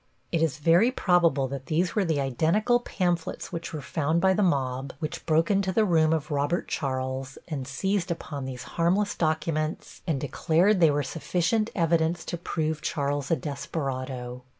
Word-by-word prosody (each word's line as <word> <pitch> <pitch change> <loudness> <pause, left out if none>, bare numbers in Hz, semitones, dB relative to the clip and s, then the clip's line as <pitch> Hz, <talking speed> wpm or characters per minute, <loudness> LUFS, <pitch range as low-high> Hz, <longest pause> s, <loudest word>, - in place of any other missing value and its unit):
It 165 - +1
is 160 -5 +1
very 170 +9 +4
probable 170 - +3
that 135 -1 -6
these 170 +3 +1
were 210 - +2
the 160 -4 0
identical 165 - +2
pamphlets 175 -9 -2
which 170 -1 -5
were 150 -3 -5
found 160 +3 0
by 190 +2 +4
the 210 - +1
mob 135 -6 0
which 155 -2 -5
broke 165 +3 +3
into 195 -1 +2
the 215 +3 +3
room 160 -4 +3
of 155 -1 -1
Robert 145 +5 0
Charles 130 -1 -3
and 140 -6 -4
seized 190 +6 -1
upon 150 -5 -4
these 130 -2 -6
harmless 185 +5 +1
documents 155 -1 -2
and 155 -5 0
declared 165 - +2
they 165 -2 +6
were 145 0 +1
sufficient 175 - 0
evidence 165 -1 +1
to 175 - -3
prove 155 -2 -2
Charles 140 -2 -1
a 165 - +4
desperado. 130 -5 -4
160 Hz, 170 wpm, -27 LUFS, 140-175 Hz, -, they